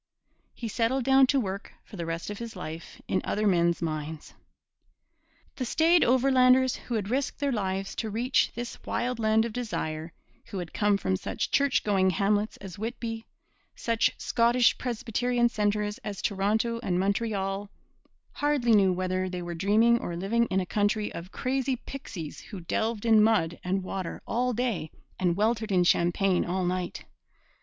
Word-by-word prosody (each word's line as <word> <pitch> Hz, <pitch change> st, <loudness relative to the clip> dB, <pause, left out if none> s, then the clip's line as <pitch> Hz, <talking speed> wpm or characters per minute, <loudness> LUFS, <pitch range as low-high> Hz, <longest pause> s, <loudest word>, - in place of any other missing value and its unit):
He 235 Hz, -, -5 dB
settled 235 Hz, +4 st, 0 dB
down 265 Hz, +1 st, +5 dB
to 275 Hz, +1 st, +3 dB
work 200 Hz, -2 st, -4 dB
for -, -, -13 dB
the 170 Hz, -3 st, -4 dB
rest 165 Hz, +4 st, -4 dB
of 205 Hz, -, -7 dB
his 230 Hz, -2 st, -7 dB
life 165 Hz, -2 st, -8 dB
in 185 Hz, -, 0 dB
other 210 Hz, +1 st, -1 dB
men's 170 Hz, -3 st, +2 dB
mines. 155 Hz, -1 st, -4 dB, 1.2 s
The 260 Hz, -, -2 dB
staid 325 Hz, +7 st, +4 dB
Overlanders, 255 Hz, 0 st, +4 dB
who 240 Hz, -, -5 dB
had 210 Hz, -1 st, -2 dB
risked 275 Hz, +2 st, -1 dB
their 285 Hz, -1 st, 0 dB
lives 195 Hz, -3 st, -2 dB
to 220 Hz, -, -2 dB
reach 240 Hz, +5 st, +1 dB
this 240 Hz, 0 st, -6 dB
wild 245 Hz, 0 st, -2 dB
land 220 Hz, 0 st, +3 dB
of 230 Hz, -, -5 dB
desire, 165 Hz, -9 st, -3 dB, 0.3 s
who 195 Hz, -, -7 dB
had 175 Hz, -3 st, -6 dB
come 205 Hz, -1 st, +2 dB
from 95 Hz, -, 0 dB
such -, -, -3 dB
church 280 Hz, -1 st, +2 dB
going 190 Hz, -3 st, +3 dB
hamlets 205 Hz, +4 st, +1 dB
as 195 Hz, -2 st, -10 dB
Whitby, 225 Hz, 0 st, -4 dB, 0.5 s
such 230 Hz, -1 st, +1 dB
Scottish 240 Hz, +1 st, +3 dB
Presbyterian 240 Hz, 0 st, 0 dB
centres 210 Hz, -1 st, -1 dB
as 205 Hz, -2 st, -6 dB
Toronto 220 Hz, +4 st, 0 dB
and 180 Hz, -6 st, 0 dB
Montreal, 200 Hz, 0 st, -1 dB, 0.6 s
hardly 290 Hz, -5 st, +1 dB
knew 200 Hz, -3 st, +5 dB
whether 185 Hz, +1 st, -1 dB
they 180 Hz, -1 st, -5 dB
were 175 Hz, 0 st, -5 dB
dreaming 215 Hz, +7 st, +3 dB
or 175 Hz, -, -4 dB
living 225 Hz, +7 st, +1 dB
in 190 Hz, -, +1 dB
a 185 Hz, -, -1 dB
country 205 Hz, +2 st, 0 dB
of 175 Hz, +3 st, -8 dB
crazy 265 Hz, 0 st, -1 dB
pixies 200 Hz, -, -8 dB
who 195 Hz, -5 st, -9 dB
delved 220 Hz, +5 st, -2 dB
in 220 Hz, -2 st, +6 dB
mud 205 Hz, -7 st, +2 dB
and 190 Hz, +1 st, -1 dB
water 185 Hz, -2 st, -5 dB
all 250 Hz, +2 st, 0 dB
day 235 Hz, -9 st, -1 dB, 0.3 s
and 175 Hz, -2 st, +2 dB
weltered 220 Hz, 0 st, +1 dB
in 180 Hz, -2 st, +4 dB
champagne 175 Hz, +2 st, +2 dB
all 180 Hz, +1 st, -1 dB
night. 180 Hz, 0 st, -3 dB
210 Hz, 165 wpm, -28 LUFS, 185-235 Hz, 1.2 s, in